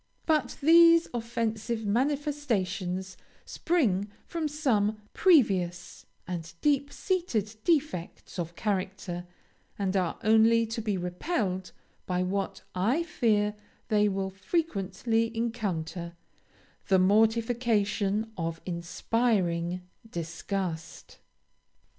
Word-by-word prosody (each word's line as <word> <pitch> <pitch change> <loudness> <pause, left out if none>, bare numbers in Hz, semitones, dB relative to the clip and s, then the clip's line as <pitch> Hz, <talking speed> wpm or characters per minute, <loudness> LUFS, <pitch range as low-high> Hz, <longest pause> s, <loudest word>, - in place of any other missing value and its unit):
But 305 -6 +1
these 335 +1 +7
offensive 230 -1 -2
manifestations 205 -8 -1 0.3
spring 215 - +1 0.2
from 330 -2 -2
some 225 -9 +1
previous 190 - +2 0.2
and 170 -2 -5
deep 285 -1 +1
seated 240 - -1
defects 290 - -1
of 170 0 -4
character, 190 -3 -3 0.5
and 195 -1 -1
are 180 -3 0
only 225 +1 +5
to 225 +1 -4
be 210 -3 -1
repelled 185 - -2 0.4
by 180 0 0
what, 195 +2 -2
I 230 - +1
fear, 215 -11 +1 0.4
they 210 -1 +4
will 190 0 -2
frequently 225 - -1
encounter 185 -7 -3 0.7
the 190 - +5
mortification 220 0 +2
of 165 -2 -3
inspiring 180 -1 0 0.3
disgust. 170 0 -5
210 Hz, 90 wpm, -28 LUFS, 185-240 Hz, 0.7 s, these